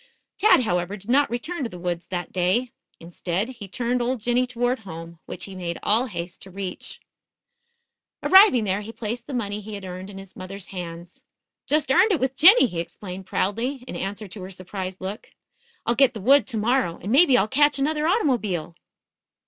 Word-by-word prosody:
Tad, 405 -10 +5
however, 180 -1 -1
did 200 +4 -6
not 285 +2 +4
return 280 +7 -3
to 235 - -2
the 180 - -9
woods 175 -1 -3
that 175 -2 -5
day. 190 +8 +1 0.3
Instead, 175 +5 -3
he 235 -6 -9
turned 245 +4 -1
old 245 +1 -1
Jinny 245 +3 +1
toward 245 +1 -1
home, 165 -4 -9
which - - -6
he 195 - -7
made 175 -2 -4
all 230 +5 +3
haste 175 -4 -6
to 190 - -8
reach. 190 -1 -7 1.2
Arriving 380 - +7
there 195 0 0
he 215 +2 -8
placed 230 +1 -5
the 285 - -6
money 210 -3 -2
he 210 +1 -7
had 200 -1 -8
earned 185 +1 -7
in 195 - -10
his 195 -1 -11
mother's 190 +1 -8
hands. 175 -1 -8 0.5
"Just 300 -2 +2
earned 420 +10 +5
it 350 - +2
with 260 0 0
Jinny," 380 - +8
he 180 -8 -3
explained 185 +2 -7
proudly, 240 +7 -1
in - - -6
answer 200 +4 -4
to 190 +2 -9
her 185 - -7
surprised 185 0 -6
look. 195 +3 -6 0.6
"I'll 235 - +2
get 250 0 +4
the - - -5
wood 275 +7 +5
to 235 - -3
morrow, 225 -5 +1
and 200 - -5
maybe 275 -1 +6
I'll 200 - +2
catch 290 +3 +3
another 300 +2 0
automobile." 220 - 0
210 Hz, 195 wpm, -24 LUFS, 185-255 Hz, 1.2 s, Jinny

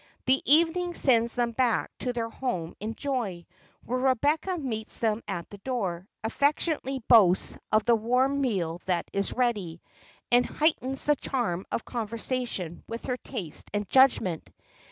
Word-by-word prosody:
The 260 +1 +3
evening 340 +3 +3
sends 235 -3 +3
them 240 -1 0
back 240 -1 0
to 250 - -1
their 230 -2 -3
home 185 -12 -3
in 220 +2 -4
joy: 230 -12 -3 0.4
where 255 +2 -1
Rebecca 290 +8 +1
meets 225 -8 -5
them 220 -1 0
at 175 -4 -4
the 205 - -10
door, 195 -7 -3 0.2
affectionately 275 +1 0
boasts 190 -6 +5 0.2
of 215 0 +3
the 240 - +5
warm 250 +5 +2
meal 180 -9 -1
that 180 -2 0
is 200 0 0
ready, 205 -10 -1 0.5
and 245 0 +6
heightens 270 -2 +1
the 295 - +4
charm 230 -10 -2
of - - -2
conversation 230 -5 -3
with 230 +1 -6
her 250 -1 -2
taste 195 - -6
and 205 -1 -1
judgment. 260 -10 +3
235 Hz, 150 wpm, -27 LUFS, 205-265 Hz, 0.5 s, and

